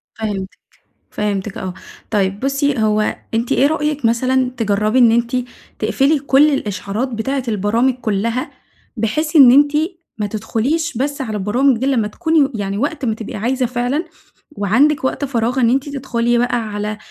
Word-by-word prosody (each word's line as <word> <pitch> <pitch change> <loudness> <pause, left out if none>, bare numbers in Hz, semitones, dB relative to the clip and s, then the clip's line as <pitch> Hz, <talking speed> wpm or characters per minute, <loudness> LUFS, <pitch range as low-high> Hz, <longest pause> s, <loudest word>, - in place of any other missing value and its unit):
فِهمتك، 205 -4 -3 0.6
فِهمتك 205 -1 -3
آه. 185 -1 -5 0.4
طيب 200 -2 0
بصي 275 0 0
هو 215 -1 +1 0.2
أنتِ 230 +1 0
إيه 275 - +4
رأيك 300 -2 -1
مثلًا 255 +2 +2
تجربي 215 +1 +1
إن 235 -3 +6
أنتِ 235 +2 +1 0.4
تقفلي 290 +3 +2
كل 280 +2 +4
الإشعارات 205 +1 -3
بتاعة 255 +3 -2
البرامج 225 +5 +1
كلها؟ 230 +1 -2 0.5
بحيث 300 +9 -1
إن 265 -5 +9
أنتِ 285 +2 +5 0.5
ما 210 - -1
تدخليش 230 +9 -2
بس 280 +2 -2
على 220 -5 -3
البرامج 235 +6 +2
دي 260 - -2
لما 240 -6 +1
تكوني 320 +2 +2
يعني 200 -2 -3
وقت 290 +3 -2
ما 225 -3 0
تبقي 220 -1 -8
عايزة 250 +5 0
فعلًا، 250 +6 -1 0.5
وعندك 270 +6 +2
وقت 265 +2 -1
فراغ 245 -1 -1
إن 235 -2 +4
أنتِ 270 +3 0
تدخلي 240 -4 0
بقى 245 0 +1 0.2
على 210 +1 -3
240 Hz, 155 wpm, -18 LUFS, 215-275 Hz, 0.6 s, إن